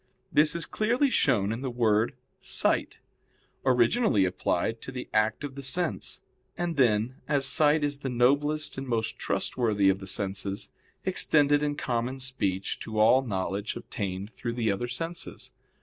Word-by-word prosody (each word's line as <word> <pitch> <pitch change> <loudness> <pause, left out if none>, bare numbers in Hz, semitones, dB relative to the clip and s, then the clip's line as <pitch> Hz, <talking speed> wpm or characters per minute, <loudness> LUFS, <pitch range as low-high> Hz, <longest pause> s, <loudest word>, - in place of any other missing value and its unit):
This 150 +2 +4
is 170 - -1
clearly 245 +6 +1
shown 105 - +2
in 115 +2 -4
the 135 - -2
word 115 -2 +1 0.2
"sight," - - 0 0.7
originally 125 - +3
applied 110 +4 -1
to - - -7
the 125 -1 -6
act 110 +4 +1
of 145 -2 -5
the 140 - -7
sense, 155 +5 -2 0.4
and 175 -1 -2
then, 120 -1 +2
as 140 -2 +2
sight 150 +2 +4
is 145 -1 -1
the 135 - -3
noblest 140 +5 +1
and 135 - -6
most 115 -1 -1
trustworthy 105 -5 +1
of 95 0 +1
the 95 - -9
senses, 100 0 -4 0.3
extended 145 -1 +3
in 145 -1 0
common 125 -1 -2
speech 100 -8 -2
to 110 -1 -6
all 115 +5 +6
knowledge 100 -3 -3
obtained 100 +1 -5
through 120 0 -4
the 115 -3 0
other 100 +5 -2
senses. 165 +8 -5
125 Hz, 155 wpm, -28 LUFS, 110-145 Hz, 0.7 s, all